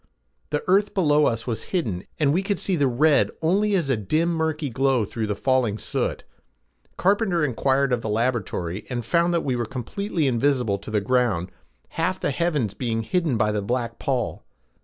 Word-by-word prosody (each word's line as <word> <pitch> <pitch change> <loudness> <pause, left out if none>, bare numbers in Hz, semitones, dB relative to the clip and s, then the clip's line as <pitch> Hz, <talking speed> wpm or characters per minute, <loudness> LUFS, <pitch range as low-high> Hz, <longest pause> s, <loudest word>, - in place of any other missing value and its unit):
The 150 0 -1
earth 195 +3 +2
below 150 -5 +4
us 115 -1 -1
was 115 -3 -3
hidden 100 - -3
and 145 -2 +3
we 180 - +2
could 195 0 -1
see 190 - 0
the 145 -4 +2
red 140 +4 +3
only 200 +5 +2
as 170 -6 +1
a - - +3
dim 155 - 0
murky 160 -2 -1
glow 130 -2 +2
through 110 +2 -3
the 105 - -1
falling 125 -3 +1
soot. - - -2 0.7
Carpenter 190 -4 +2
inquired 135 +1 +1
of 120 - 0
the 110 - -4
laboratory 105 -5 -2
and 120 -3 -3
found 170 +5 +2
that 170 -1 +1
we 130 -3 0
were 120 - -1
completely 155 - -3
invisible 125 -5 +1
to 100 - -10
the 105 -1 +1
ground, 110 -6 +1 0.4
half 185 +3 -1
the - - 0
heavens 145 - 0
being 115 -2 -2
hidden 155 0 0
by 105 0 +2
the 105 -1 -1
black 115 +2 -2
pall. 130 -6 -2
130 Hz, 185 wpm, -24 LUFS, 115-165 Hz, 0.7 s, below